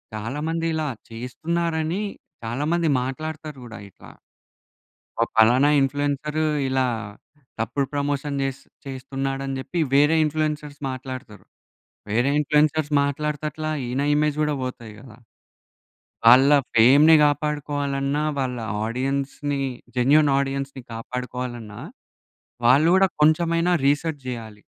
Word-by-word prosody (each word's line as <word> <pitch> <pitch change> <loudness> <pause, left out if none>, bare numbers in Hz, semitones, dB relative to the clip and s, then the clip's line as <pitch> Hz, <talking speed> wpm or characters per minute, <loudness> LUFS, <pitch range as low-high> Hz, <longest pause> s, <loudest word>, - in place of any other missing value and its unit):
చాలా 115 +7 -4
మంది 165 0 -2
ఇలా 155 -1 -1 0.2
చేస్తున్నారని 160 - -2 0.4
చాలా 120 +5 -3
మంది 170 -1 +1
మాట్లాడుతారు 150 +3 -5
కూడా 115 -1 -9
ఇట్లా - - -15 1.1
ఓ - - +6
పలానా 125 +6 +5
ఇన్‌ఫ్లుయెన్సర్ 145 +2 -1 0.3
ఇలా 130 0 +1 0.7
తప్పుడు 135 +5 -1
ప్రమోషన్ 145 0 -2
చేస్ 135 -1 -3 0.3
చేస్తున్నాడు 135 0 -4
అని 135 - -3
చెప్పి 170 +6 -4 0.2
వేరే 150 +3 +5
ఇన్‌ఫ్లుయెన్సర్స్ 150 -1 -3
మాట్లాడుతారు. 130 -4 -8 0.7
వేరే 120 +6 +2
ఇన్‌ఫ్లుయెన్సర్స్ 150 +1 +2
మాట్లాడుతట్ల 150 +2 -3 0.2
ఈయన 130 +3 -1
ఇమేజ్ 150 0 +1
కూడా 150 -1 0
పోతాయి 120 -4 -6
కదా! 120 -3 -14 1.1
వాళ్ళ 130 +4 +8 0.3
ఫేమ్‌ని 140 +8 +7
కాపాడుకోవాలన్నా, 145 -1 -1 0.2
వాళ్ళ 125 -2 -2 0.3
ఆడియన్స్‌ని 140 +3 -2 0.4
జెన్యూన్ 145 +4 +4
ఆడియన్స్‌ని 135 -1 -3
కాపాడుకోవాలన్నా 120 -2 -6 0.9
వాళ్ళు 140 +7 +5
కూడా 190 0 +5
కొంచెమైనా 165 +3 +3 0.2
రిసర్చ్ 145 0 0
చేయాలి. 110 -4 -7
140 Hz, 105 wpm, -23 LUFS, 130-150 Hz, 1.1 s, వాళ్ళ